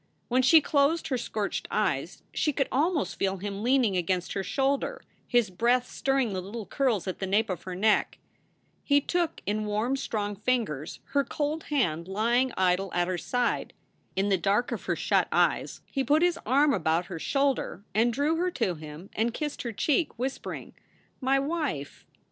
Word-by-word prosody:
When 250 +1 +3
she 310 +5 +7
closed 295 +3 +2
her 260 - +1
scorched 210 -3 -3
eyes - - -1
she 300 - +1
could 275 -1 0
almost 305 +3 +1
feel 195 0 0
him 200 +1 -5
leaning 245 -4 +3
against 180 0 -1
her 195 - -1
shoulder, 275 - -1 0.2
his 240 -5 +2
breath 240 +6 +2
stirring 270 -5 0
the 185 - -2
little 210 +4 -6
curls 230 -3 0
at 185 - -3
the 190 - -2
nape 205 +2 +2
of 180 - -4
her 185 -1 -5
neck. 215 +3 +2 0.7
He 285 0 +4
took 340 +2 -1
in 215 +1 -1
warm, 215 +6 0
strong 205 -6 -3
ringers 210 - -1
her 280 -1 +4
cold 300 +3 -2
hand 170 - 0
lying 235 +6 +1
idle 185 0 +2
at 175 0 +2
her 185 -1 -1
side. 245 +5 -1 0.4
In 195 +2 +1
the 190 -2 +2
dark 205 +6 +1
of - - -4
her - - 0
shut - - +2
eyes - - +1
he 275 - -2
put 300 +4 +3
his 350 -1 +2
arm 280 +2 +4
about 165 -2 +1
her 175 -3 -6
shoulder 275 - 0
and 230 +3 +3
drew 290 +6 +1
her 360 +2 +1
to 190 - -1
him 155 +4 -10
and 230 +2 0
kissed 300 -2 -3
her 235 - -3
cheek, 295 - 0
whispering, 260 +3 -4 0.5
"My 270 0 +2
wife!" 280 - -3
235 Hz, 180 wpm, -28 LUFS, 195-275 Hz, 0.7 s, she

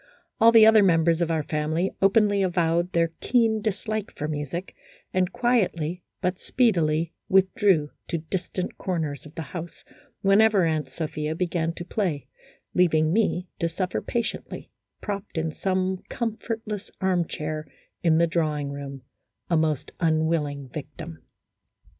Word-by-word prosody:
All 230 +1 +7
the 225 -2 +8
other 220 -1 +7
members 165 -3 +3
of 170 - +1
our 160 -2 0
family 155 +5 -1
openly 200 0 +4
avowed 175 -1 +1
their 165 -1 +2
keen 225 -3 +2
dislike 215 0 -2
for 150 - -2
music, 155 +4 -4 0.4
and 185 -1 +1
quietly 185 -9 0 0.2
but 180 0 -1
speedily 170 -9 +1 0.2
withdrew 190 -4 +3 0.2
to 170 - -1
distant 180 +3 -4
corners 160 -6 -3
of 150 - -16
the 165 - -4
house 170 -1 -7 0.4
whenever 200 -1 +5
Aunt 155 -4 -1
Sophia 155 +1 -3
began 170 -1 0
to 175 - -7
play, 180 - -1 0.5
leaving 160 -3 +3
me 190 -4 +1
to 170 - +1
suffer 180 +2 -2
patiently, 235 0 -4 0.3
propped 200 -3 -5
in 160 0 0
some 185 +2 -1
comfortless 220 -2 -4
armchair 160 -5 -1 0.3
in 165 -3 +4
the 170 - +5
drawing 155 -4 -1
room, 140 -2 -7 0.5
a - - +4
most 155 -3 0
unwilling 155 -4 0
victim. 155 +4 -8
170 Hz, 135 wpm, -25 LUFS, 155-195 Hz, 0.5 s, the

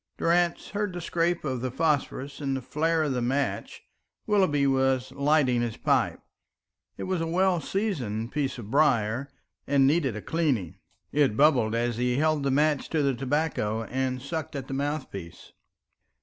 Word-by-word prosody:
Durrance 170 0 +1
heard 205 -2 -2
the 175 - -4
scrape 170 0 0
of 130 -5 -2
the 130 - -1
phosphorus 140 0 -1
and 135 -2 -1
the - - -5
flare 160 +4 +1
of 145 -3 0
the 125 - -1
match. 135 +4 -2 0.4
Willoughby 185 -10 +2
was 130 -1 +1
lighting 140 -4 +2
his 120 -2 -3
pipe. - - +1 0.8
It - - -5
was 185 -2 -1
a 165 - -1
well 180 0 +2
seasoned 130 - -2
piece 140 -3 -2
of 110 -3 -8
briar, 130 -3 +2 0.4
and 140 -1 +4
needed 140 -5 +2
a 105 - -5
cleaning; 145 - -1 0.3
it 140 -7 +2
bubbled 125 -7 +4
as 120 0 0
he 125 +1 +1
held 155 0 +2
the 140 - 0
match 150 +1 +1
to 155 -3 +1
the 140 -1 +2
tobacco 130 -4 -1
and 130 +2 -2
sucked 150 +4 -5
at 135 -2 -5
the - - -5
mouthpiece. 135 - -5
140 Hz, 165 wpm, -27 LUFS, 125-160 Hz, 0.8 s, and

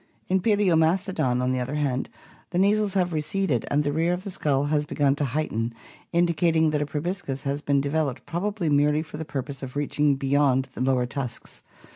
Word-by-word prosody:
In 190 +1 +3
Pal(Bomastodony 175 - +2
on 125 - +1
the 130 - 0
other 130 +4 -3
hand, 135 -4 -1 0.4
the 175 - -3
nasals 205 +1 +3
have 180 -3 +1
receded 155 - -1
and 145 +1 +2
the 145 - 0
rear 165 +3 +1
of 180 +1 -4
the 200 - -5
skull 145 -7 0
has 145 0 +1
begun 145 -1 +1
to 145 - 0
heighten, 115 -4 -2 0.4
indicating 170 -2 +2
that 150 -1 0
a 150 - -1
proboscis 150 -3 -3
had 140 +1 -2
been 140 -1 +3
de 140 - -2
veloped 155 -5 -1
probably 190 +1 -2
merely 150 +1 +3
for 155 -2 -9
the 160 - -5
purpose 135 -1 -5
of 130 -1 -7
reaching 145 0 +1
beyond 135 -1 +2
the - - -6
lower 130 -1 +2
tusks. 125 -2 -6
150 Hz, 195 wpm, -25 LUFS, 135-170 Hz, 0.4 s, In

